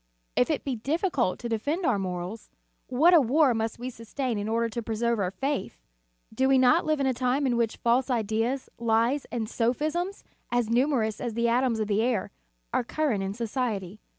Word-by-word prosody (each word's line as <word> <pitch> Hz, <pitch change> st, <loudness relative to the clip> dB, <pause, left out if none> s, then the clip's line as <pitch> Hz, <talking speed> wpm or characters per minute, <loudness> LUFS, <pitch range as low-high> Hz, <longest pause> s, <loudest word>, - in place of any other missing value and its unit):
If 250 Hz, -, +3 dB
it 310 Hz, -, -1 dB
be 270 Hz, -3 st, -2 dB
difficult 280 Hz, -, 0 dB
to 240 Hz, -, -3 dB
defend 285 Hz, -, -1 dB
our 225 Hz, -8 st, +2 dB
morals, 185 Hz, +3 st, -5 dB, 0.4 s
what 310 Hz, +8 st, +4 dB
a 335 Hz, -, +8 dB
war 270 Hz, +2 st, +3 dB
must 225 Hz, 0 st, -2 dB
we 250 Hz, +2 st, -5 dB
sustain 230 Hz, 0 st, -3 dB
in 205 Hz, +1 st, -3 dB
order 230 Hz, +1 st, +1 dB
to 235 Hz, +1 st, -4 dB
preserve 230 Hz, +1 st, -1 dB
our 185 Hz, -2 st, 0 dB
faith! 270 Hz, +1 st, -3 dB, 0.6 s
Do 260 Hz, +4 st, +2 dB
we 270 Hz, -, +5 dB
not 260 Hz, +7 st, +4 dB
live 310 Hz, -1 st, +1 dB
in 275 Hz, -, +1 dB
a 260 Hz, -, +2 dB
time 255 Hz, +3 st, 0 dB
in 250 Hz, -2 st, +1 dB
which 230 Hz, -2 st, 0 dB
false 245 Hz, +3 st, +2 dB
ideas, 230 Hz, +2 st, 0 dB
lies 235 Hz, +4 st, +1 dB
and 230 Hz, -3 st, -3 dB
sophisms, 310 Hz, -, -1 dB, 0.3 s
as 240 Hz, -2 st, +1 dB
numerous 240 Hz, -4 st, +1 dB
as 235 Hz, -3 st, -3 dB
the 235 Hz, 0 st, +1 dB
atoms 240 Hz, -1 st, +2 dB
of 215 Hz, -, 0 dB
the 205 Hz, +1 st, +1 dB
air, 230 Hz, -5 st, 0 dB, 0.4 s
are -, -, +2 dB
current 255 Hz, -4 st, -1 dB
in 195 Hz, +1 st, -3 dB
society. 220 Hz, -5 st, -3 dB
240 Hz, 195 wpm, -27 LUFS, 220-265 Hz, 0.6 s, a